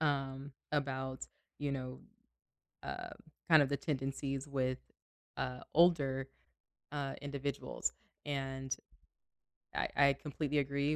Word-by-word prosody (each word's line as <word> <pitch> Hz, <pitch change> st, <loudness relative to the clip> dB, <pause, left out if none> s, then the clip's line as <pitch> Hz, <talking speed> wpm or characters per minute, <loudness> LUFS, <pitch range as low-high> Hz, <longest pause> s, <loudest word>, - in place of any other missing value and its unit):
Um, 135 Hz, -2 st, +1 dB, 0.2 s
about, 130 Hz, -2 st, 0 dB, 0.3 s
you 145 Hz, -1 st, 0 dB
know, 130 Hz, -1 st, -3 dB, 0.8 s
uh, -, -, -4 dB, 0.4 s
kind 160 Hz, -2 st, +10 dB
of 140 Hz, -, +2 dB
the 140 Hz, -, +2 dB
tendencies 135 Hz, -1 st, -1 dB
with, 130 Hz, -2 st, +1 dB, 0.6 s
uh, 125 Hz, 0 st, -1 dB
older, 140 Hz, -6 st, +5 dB, 0.6 s
uh, 140 Hz, -2 st, -1 dB
individuals, 140 Hz, -1 st, -1 dB, 0.3 s
and 135 Hz, -2 st, -1 dB, 1.0 s
I -, -, +2 dB
I 140 Hz, -1 st, +7 dB
completely 150 Hz, 0 st, -1 dB
agree 140 Hz, +2 st, +2 dB
140 Hz, 105 wpm, -36 LUFS, 135-145 Hz, 1.0 s, kind